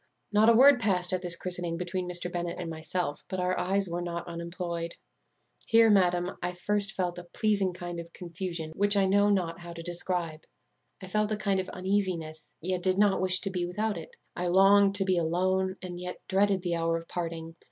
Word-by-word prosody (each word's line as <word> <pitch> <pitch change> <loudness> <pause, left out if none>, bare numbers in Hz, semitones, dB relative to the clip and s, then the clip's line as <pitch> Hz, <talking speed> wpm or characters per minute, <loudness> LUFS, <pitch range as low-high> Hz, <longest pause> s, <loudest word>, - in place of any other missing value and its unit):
"Not 215 +2 +5
a - - +7
word 270 +2 +7
passed 185 -5 +1
at 185 - 0
this 175 -2 -1
christening 175 -1 -3
between 180 +1 -3
Mr. 175 0 -2
Bennet 175 0 -3
and 170 -2 -4
myself, 160 -1 -3
but 185 - -4
our 180 0 0
eyes 195 +2 +1
were 175 0 -3
not 170 -1 -5
unemployed. 170 0 -5 0.7
Here, 225 -1 +6
madam, 180 -2 +2
I 180 0 -3
first 200 +2 +2
felt 180 -2 -2
a - - -9
pleasing 200 0 0
kind 175 -1 -6
of 170 0 -9
confusion, 170 -2 -4
which 205 +4 +1
I 195 - +4
know 205 +2 +3
not 180 -4 0
how 175 0 -9
to 165 0 -8
describe. 175 -2 -2 0.6
I - - -7
felt 215 +2 0
a 215 - 0
kind 200 -2 0
of 185 - -4
uneasiness, 185 -5 -2
yet 180 +2 -2
did 185 +1 +1
not 200 -2 +3
wish 185 0 +4
to 195 - -3
be 180 -2 -2
without 210 +4 -2
it. 480 - -9 0.2
I 180 - -2
longed 195 +2 +5
to 195 -1 +3
be 185 -2 +2
alone, 185 +3 0
yet 180 0 -6
dreaded 195 -1 +2
the 175 -2 -1
hour 165 0 0
of 165 0 -9
parting. 165 -1 -5
180 Hz, 205 wpm, -28 LUFS, 170-195 Hz, 0.7 s, a